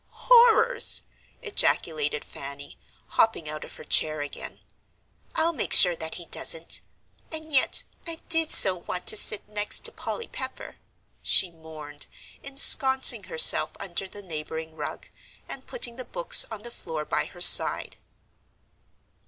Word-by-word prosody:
"Horrors!" 480 0 +3 0.4
ejaculated 155 - -1
Fanny, 140 +1 -11 0.3
hopping 220 -8 -1
out 155 0 -7
of - - -12
her - - -12
chair 155 -1 +1
again. 145 - -9 0.8
"I'll 330 +1 0
make 270 - -3
sure 180 -2 +7
that 160 -1 -7
he 175 - -8
doesn't. 165 0 -3 0.5
And 315 -1 -8
yet 275 - +2 0.2
I 330 - -4
did 325 -1 +1
so 190 - +8
want 180 +1 -7
to - - +1
sit 210 -1 +2
next 210 0 +1
to 460 - -1
Polly 465 - -7
Pepper," 260 0 -8 0.4
she 185 - +1
mourned, 155 -3 -12 0.4
ensconcing 270 -1 +3
herself 485 0 +3
under 190 +1 -5
the 205 +2 -13
neighbouring 160 -1 -8
rug, - - -8 0.4
and - - -11
putting 240 - -4
the 255 - -6
books - - +2
on 215 -2 -9
the 240 - -9
floor 155 -8 -7
by - - -3
her - - -15
side. - - +3
205 Hz, 140 wpm, -24 LUFS, -, 0.8 s, so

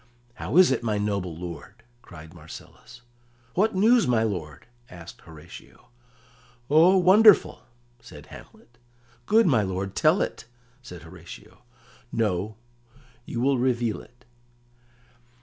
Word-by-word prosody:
"How 135 - -4
is 185 -5 +6
it, 130 - -1
my 110 -3 -2
noble 100 -5 -3
lord?" 90 +6 -10 0.2
cried 80 -4 -14
Marcellus. 85 +8 -14 0.5
"What 210 +3 0
news, 225 +4 +3
my 115 -3 +1
lord?" 85 -10 -5 0.2
asked 85 -1 -13
Horatio. 80 -6 -15 0.8
"Oh, 170 +5 +5
wonderful!" 195 +3 +5 0.4
said - - -14
Hamlet. 120 -1 -16 0.5
"Good 225 +1 +4
my 130 - +3
lord, 95 0 -4
tell 160 +5 +3
it," - - -4 0.4
said 90 -10 -12
Horatio. 80 - -14 0.5
"No; 105 -1 -2 0.7
you 120 - -4
will 135 0 +1
reveal 120 -3 -1
it." 120 +2 -22
115 Hz, 115 wpm, -24 LUFS, -, 0.8 s, is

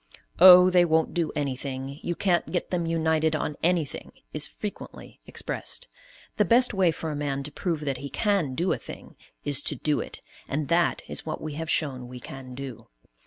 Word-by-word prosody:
"Oh, 180 0 +10
they 180 -1 +6
won't 160 -1 +2
do 170 -3 0
anything; 135 0 -4
you 175 - -2
can't 180 -2 +1
get 175 - -2
them 175 -2 0
united 160 -1 +1
on 150 -1 -2
anything!" 165 -4 -1 0.2
is 150 -1 +1
frequently 210 +5 -8
expressed. - - -5 0.5
The 210 - +5
best 235 +5 +4
way 190 -3 +3
for 160 0 -3
a - - -4
man 140 -1 -2
to 150 - -6
prove 165 0 -2
that 140 -3 -2
he 140 +2 -6
can 195 - 0
do 175 +5 +1
a - - -4
thing - - -11 0.3
is 145 0 +2
to 145 - -1
do 150 +3 0
it, - - -7 0.2
and 145 +1 -2
that 170 +1 +2
is - - -3
what 155 - -3
we 155 -1 -5
have 160 +2 -5
shown 130 -7 0
we 125 0 -9
can 130 0 -9
do. 135 -3 -8
155 Hz, 195 wpm, -26 LUFS, 140-175 Hz, 0.5 s, Oh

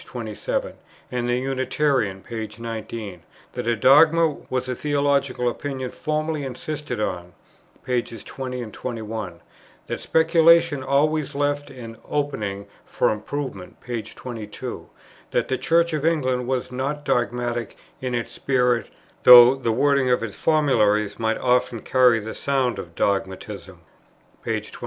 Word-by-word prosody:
27, - - -4 0.4
and 120 -1 -2
the 120 - +2
Unitarian, 130 -5 0
p. 110 -1 -6
19; 110 -5 -6 0.3
that - - -5
a 120 - +2
dogma 155 +7 +6 0.2
was 130 0 -2
a 130 - -1
theological 140 -3 0
opinion 130 +1 -3
formally 155 -1 -2
insisted 145 +2 -5
on, 90 -4 -3 0.5
pp. 120 -3 -2
20, 125 -2 -5
21; 110 -8 -6 0.4
that - - -4
speculation 165 -2 +4
always 150 +2 +1
left 145 0 -1
an 115 -4 -10
opening 105 -9 -2 0.2
for - - 0
improvement, 110 -2 -5
p. 120 -2 -4
22; 110 0 -8 0.4
that - - 0
the 130 - 0
Church 170 0 +2
of 150 -2 -1
England 130 -7 +1
was 130 -1 -2
not 140 +3 -3
dogmatic 120 -1 -1 0.2
in 130 -1 -2
its 120 - -3
spirit, 125 -3 +1 0.3
though 125 0 +10
the 130 -4 -2
wording 140 +2 +2
of 125 -2 +2
its 105 -3 -4
formularies 110 -10 +2
might 110 0 0
often 125 -2 +1
carry 125 0 +4
the 110 +1 -5
sound 135 -3 0
of 85 -1 -9
dogmatism, 95 -1 -3 0.6
p. - - -6
23. - - -12
125 Hz, 135 wpm, -23 LUFS, 115-145 Hz, 0.6 s, though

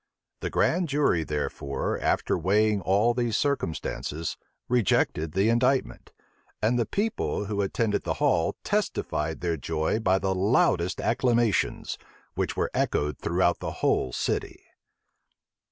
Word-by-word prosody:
The - - -3
grand 175 -1 +1
jury, 140 - +2
therefore, 75 -2 -3
after - - +1
weighing 105 +4 +2
all 100 +6 +3
these 120 -2 0
circumstances, 85 - -2 0.3
rejected 85 -9 +1
the 95 +3 +2
indictment; 125 +3 +1 0.5
and 120 +3 +1
the 115 - 0
people 210 - -1
who 100 0 -1
attended 105 +2 0
the - - -2
hall - - +1
testified 80 +2 -1
their 85 -2 -1
joy 80 +7 -1
by 95 -3 +2
the 95 0 0
loudest 95 -3 +2
acclamations, 120 -3 +1 0.3
which - - -2
were - - 0
echoed 75 -1 0
throughout 85 +1 +1
the - - -4
whole 65 - +2
city. - - -3
100 Hz, 125 wpm, -27 LUFS, 85-120 Hz, 0.5 s, all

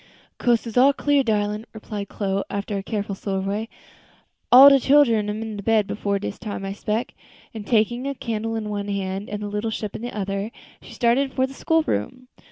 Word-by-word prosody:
"Coast 235 -2 +1
all 275 +2 +6
clear, 290 0 +2
darlin'," 210 -1 -1
replied 210 -2 -6
Chloe, 195 -1 -1
after 200 +1 -3
a 195 - -2
careful 200 0 -3
survey; 195 +3 -3 0.8
"all 260 +3 +11
de 275 -1 +7
chillens 240 -7 +4
am 215 +2 -3
in 220 -2 -6
bed 215 +1 +2
before 200 0 -2
dis 200 0 -5
time, 205 -3 -5
I 195 - -3
spec." 215 +3 -3 0.4
And 215 -2 -8
taking 240 +3 +1
a 280 - -3
candle 225 -2 -3
in 215 -1 -3
one 205 -1 -3
hand 195 0 -3
and 210 0 -4
the - - -3
little 210 +2 -2
ship 210 -2 -5
in - - -6
the 240 -2 -6
other, 200 +1 -2 0.3
she - - -12
started 255 +3 +2
for 260 - +2
the 265 - -9
school 325 +3 +1
room. 250 - -3
215 Hz, 195 wpm, -23 LUFS, 200-240 Hz, 0.8 s, all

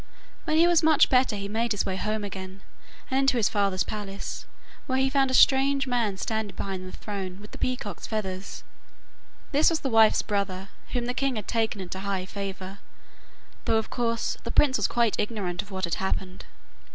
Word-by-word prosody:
When 310 - +1
he 335 - +6
was 345 -2 +5 0.3
better 250 -4 +4
he 200 -1 -4
made 225 +2 0
his 205 - 0
way 190 - -2
home 215 +2 -2
again, 190 -1 -7 0.5
and 265 - +3
into 270 -2 +3
his 220 - +3
father's 200 -2 +1
palace, 200 -2 -6 0.4
where 260 -2 +1
he 265 0 +2
found 270 -1 +3
a 260 - +1
strange 270 +1 +5
man 235 -6 0
standing 220 +1 -3
behind 190 -2 -4
the - - -9
throne 195 -3 -5
with 210 +1 -12
the - - -10
peacock's 230 -7 -3
feathers. 195 -3 -4 0.9
This 290 +2 +5
was 330 -2 -1
his 270 - -2
wife's 220 -1 +5
brother, 195 -2 -2 0.2
whom 245 -2 0
the 245 - -1
king 270 0 0
had 210 -3 -5
taken 225 -3 0
into 185 0 -5
high 195 -1 -2
favour, 195 0 -6 0.9
though, 225 - +3
of 220 - -2
course, 230 -2 -1
the 235 - -4
prince 265 +2 +4
was 210 - +2
quite 235 -3 +1
ignorant 200 -5 -2
of 205 - -15
what 190 -1 -5
had 170 -3 0
happened. 190 0 -3
210 Hz, 190 wpm, -27 LUFS, 195-245 Hz, 0.9 s, he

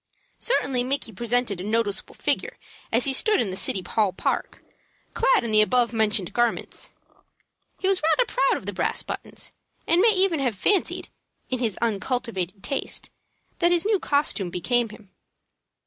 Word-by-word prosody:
Certainly 265 - +1
Micky 265 -2 -1
presented 235 -2 0
a - - -5
noticeable 215 -1 -1
figure - - 0 0.3
as 235 +2 +2
he 270 - +2
stood 425 +9 +4
in 200 - 0
the - - -4
City 190 0 0
Hall 210 -4 +1
Park, - - -3 0.5
clad - - +3
in 230 - -2
the 215 0 +6
above 240 +2 +2
mentioned 215 -4 +1
garments. 240 -1 -1 0.9
He 380 - -2
was 385 -1 +2
rather 325 +11 +3
proud - - +1
of - - -10
the - - -4
brass - - -1
buttons, - - -7 0.3
and 340 +2 +3
may 455 - +6
even 380 -6 +2
have 250 -5 0
fancied, 390 - +1 0.4
in 255 - -1
his 225 -6 -1
uncultivated 210 -4 -2
taste, 275 - -4 0.5
that 345 - +4
his 350 +1 +2
new 420 -2 +2
costume 285 - 0
became 235 +7 0
him. 210 -2 -15
240 Hz, 165 wpm, -24 LUFS, 215-320 Hz, 0.9 s, the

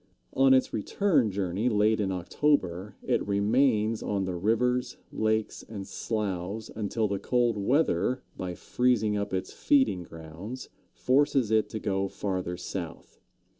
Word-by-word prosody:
On 135 0 +4
its 130 - +1
return 140 - +1
journey 100 +3 -1
late 110 0 +2
in 100 -2 0
October, 95 - 0
it - - 0
remains 110 +2 +2
on 100 -2 -1
the 95 - -3
rivers, 125 +7 0
lakes, 110 0 -1
and 100 -3 -6
sloughs 105 -1 -3
until 110 +1 -1
the 100 -1 -2
cold 120 -1 +1
weather, 125 - +1
by 90 -1 -5
freezing 115 -3 +1
up 100 0 -2
its 95 0 -3
feeding 270 - +2
grounds, 85 +9 -9 0.2
forces 130 -3 +2
it 110 -1 +3
to 110 - -4
go 100 -1 -1
farther 95 -3 -3
south. 85 -1 -7
105 Hz, 135 wpm, -28 LUFS, 95-125 Hz, 0.2 s, On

